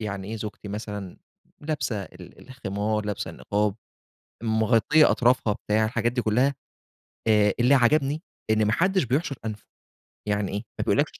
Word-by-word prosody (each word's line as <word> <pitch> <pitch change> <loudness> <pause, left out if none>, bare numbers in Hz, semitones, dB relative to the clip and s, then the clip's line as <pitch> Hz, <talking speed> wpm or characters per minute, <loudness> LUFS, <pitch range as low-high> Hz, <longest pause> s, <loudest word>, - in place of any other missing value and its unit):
يعني 100 -2 -4
إيه 115 - -4
زوجتي 105 -1 -7
مثلًا 105 -3 -6 0.4
لابسة 145 -9 -2
ال 90 +6 -13
الخمار، 105 -3 -2
لابسة 105 - -3
النقاب، 105 -1 -1 0.7
مغطية 115 +7 +4
أطرافها 125 -3 +3
بتاع، 110 +1 0
حاجات 120 +1 0
دي 125 - -1
كلّها، 125 +6 +2 0.7
آآ 105 -2 +4
اللي 125 +4 +5
عجبني 140 +4 +3 0.3
إن 110 -1 +3
ما 105 - +2
حدش 190 +2 +2
بيحشُر 140 +4 -1
أنفه، 110 -1 -5 0.6
يعني 105 -1 0
إيه، 100 - -2 0.2
ما - - +1
بيقولكش - - +1
110 Hz, 145 wpm, -25 LUFS, 105-130 Hz, 0.7 s, اللي